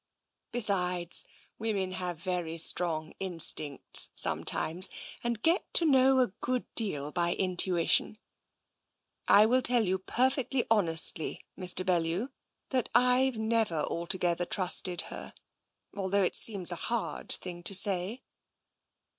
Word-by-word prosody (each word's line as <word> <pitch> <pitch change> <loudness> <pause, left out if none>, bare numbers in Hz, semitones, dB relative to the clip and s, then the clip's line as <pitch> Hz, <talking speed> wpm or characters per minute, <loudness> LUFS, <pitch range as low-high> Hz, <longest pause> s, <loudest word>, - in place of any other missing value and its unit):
Besides, 180 -6 0 0.3
women 205 -4 -3
have 180 -2 -5
very 170 -1 -4
strong 160 -1 -1
instincts 165 -6 -1
sometimes, 175 +4 0 0.3
and 235 -2 -3
get 335 +3 0
to 335 - +4
know 265 -2 +4
a 250 - +1
good 250 0 -2
deal 150 -10 0
by 175 0 0
intuition. 185 +1 +1 1.1
I 210 - +6
will 255 +3 +2
tell 245 -1 +5
you 190 0 -1
perfectly 260 +4 -1
honestly, 165 -6 +1
Mr. 185 -1 +2
Bellew, 175 +6 -1 0.4
that 255 -4 -1
I've 250 0 +3
never 220 -4 -1
altogether 175 0 -1
trusted 180 0 +2
her, - - -9 0.6
although 195 0 0
it 180 - -1
seems 195 -5 +4
a 175 - -4
hard 235 -2 -4
thing 175 -1 -6
to 195 +3 -1
say." 195 +4 +1
190 Hz, 120 wpm, -29 LUFS, 175-230 Hz, 1.1 s, I